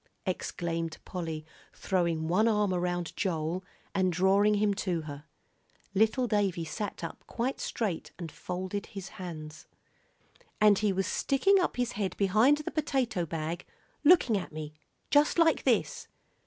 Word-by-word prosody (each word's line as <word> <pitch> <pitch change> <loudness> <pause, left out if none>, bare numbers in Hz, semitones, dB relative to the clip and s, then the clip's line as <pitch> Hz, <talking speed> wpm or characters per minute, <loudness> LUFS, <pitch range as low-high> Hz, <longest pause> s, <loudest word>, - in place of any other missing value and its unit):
exclaimed 165 -3 -3
Polly, 160 -4 -4 0.3
throwing 170 -4 0
one 200 +7 +3
arm 210 -3 +2
around 175 -1 -2
Joel, 175 -1 -1 0.3
and 185 -1 +2
drawing 195 +4 +4
him 205 0 +2
to 185 -4 -1
her. 145 -1 -8 0.7
Little 220 +5 +3
Davie 195 -6 +1
sat 200 +3 -5
up 165 - -6
quite 250 +3 -2
straight 205 -8 -3
and 170 -3 -6
folded 185 +2 -4
his 195 -2 -8
hands. 155 -3 -8 0.9
"And 210 -2 +6
he 210 -2 +2
was 190 0 0
sticking 385 - +3
up 360 - 0
his 245 -1 0
head 200 -2 -3
behind 215 +9 +4
the 300 - -5
potato 260 - 0
bag, 165 +2 -3 0.4
looking 295 -8 +6
at - - -8
me 155 -1 -6 0.4
just 295 +3 +4
like 330 -1 +4
this." - - +1
190 Hz, 140 wpm, -30 LUFS, 170-215 Hz, 0.9 s, And